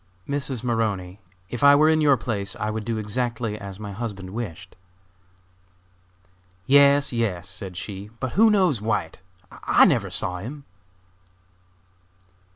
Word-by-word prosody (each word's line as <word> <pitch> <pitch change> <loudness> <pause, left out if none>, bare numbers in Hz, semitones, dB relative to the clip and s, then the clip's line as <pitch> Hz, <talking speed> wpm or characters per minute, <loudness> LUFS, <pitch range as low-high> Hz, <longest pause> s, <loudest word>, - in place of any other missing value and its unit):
"Mrs. 140 -4 -3
Maroney, 105 -6 -2 0.3
if 120 - -4
I 140 0 +8
were 155 +2 +5
in 160 0 +3
your 145 -3 +4
place, 100 -4 -3
I 105 - -3
would 110 -1 -4
do 115 -1 -2
exactly 115 +1 -2
as 100 0 -9
my 105 -1 -6
husband 100 -3 -6
wished." 95 -5 -7 1.9
"Yes, 140 +1 +5
yes," 100 -7 -2
said 95 -1 -7
she, 100 0 -7
"but 130 -2 -3
who 225 +2 +5
knows 185 - +2
White? 110 0 -2 0.3
I - - +4
never - - +1
saw 90 0 -2
him." 135 +8 -8
110 Hz, 135 wpm, -24 LUFS, 100-135 Hz, 1.9 s, I